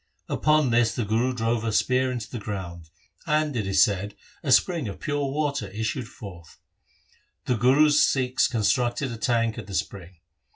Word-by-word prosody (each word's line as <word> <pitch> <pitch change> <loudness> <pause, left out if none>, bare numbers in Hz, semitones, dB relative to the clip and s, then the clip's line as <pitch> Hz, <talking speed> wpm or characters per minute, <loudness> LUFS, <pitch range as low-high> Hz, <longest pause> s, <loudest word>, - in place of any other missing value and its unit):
Upon 155 -4 +2
this 115 -1 +2
the 120 - -2
Guru 115 +5 +1
drove 115 -2 -1
a 115 - -1
spear 130 +4 +1
into 120 -4 -5
the 120 - -7
ground, 90 -6 -7 0.4
and 150 -2 +1
it 105 -5 -2
is 95 -1 +5
said, 100 0 -2 0.3
a 140 - -2
spring 165 - +3
of 100 - -7
pure 145 -1 -2
water 140 -6 -2
issued 110 +5 -4
forth. 90 -8 -12 0.9
The 125 - +1
Guru's 145 +6 +4
Sikhs 130 -2 +2
constructed 120 +3 0
a 115 - -6
tank 115 +1 0
at 105 - -9
the 100 - -6
spring. 95 -1 -4
120 Hz, 170 wpm, -25 LUFS, 105-130 Hz, 0.9 s, is